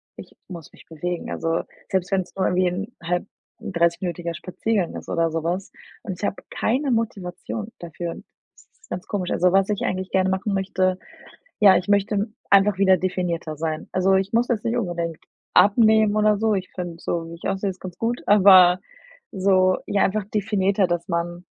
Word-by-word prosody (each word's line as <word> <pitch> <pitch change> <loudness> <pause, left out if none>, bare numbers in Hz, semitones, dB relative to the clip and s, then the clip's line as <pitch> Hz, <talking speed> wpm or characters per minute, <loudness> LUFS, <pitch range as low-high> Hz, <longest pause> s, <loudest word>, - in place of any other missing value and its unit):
ich - - -12
muss 170 -5 -10
mich - - -18
bewegen.“ 175 +2 -5
Also, 165 0 -1 0.3
selbst 190 0 -1
wenn's 190 -2 -1
nur 190 -1 0
irgendwie 180 0 +2
'n 200 +7 -4
halt 175 +2 -1 0.3
'n - - -7
dreißigminütiger 170 0 -1
Spaziergang 190 +1 -2
ist - - -8
oder 165 -1 +1
so 165 0 -2
was 180 +4 -3 0.3
und 200 - -4
ich - - -10
habe 200 - -2
keine 265 +4 0
Motivation 220 -1 -3
dafür. 170 0 -6
Das - - -12 0.6
ist - - -22
ganz 180 - -5
komisch. 185 -3 -3
Also, 180 0 +3
was 195 +1 +3
ich 210 - -1
eigentlich 185 0 -3
gerne 190 0 +2
machen 195 +2 -1
möchte: 185 -1 0 0.6
Ja, 195 -3 +7
ich 180 - -6
möchte 205 0 +2 0.2
einfach 200 0 +5
wieder 190 -1 +5
definierter 175 -3 -2
sein. 155 0 -4
Also, 185 +1 +2
ich 190 +1 0
muss 235 +2 +2
jetzt 225 -4 -1
nicht 230 +1 0
unbedingt 170 -7 -3 0.4
abnehmen 215 0 +5
oder 215 0 +3
so, 220 -1 +2
ich 185 -2 -3
finde 175 -2 -5
so, 170 -1 -3
wie - - -8
ich 170 - -6
aussehe, 195 0 -1
ist 185 - -10
ganz 180 -2 -8
gut, 235 +1 -2
aber, 185 -3 +7 0.5
so, 185 -1 +3
ja, 200 - +1
einfach 210 +1 0
definierter, 200 -2 +1
dass 175 -1 -2
man 175 0 -3
185 Hz, 185 wpm, -23 LUFS, 175-205 Hz, 0.6 s, Ja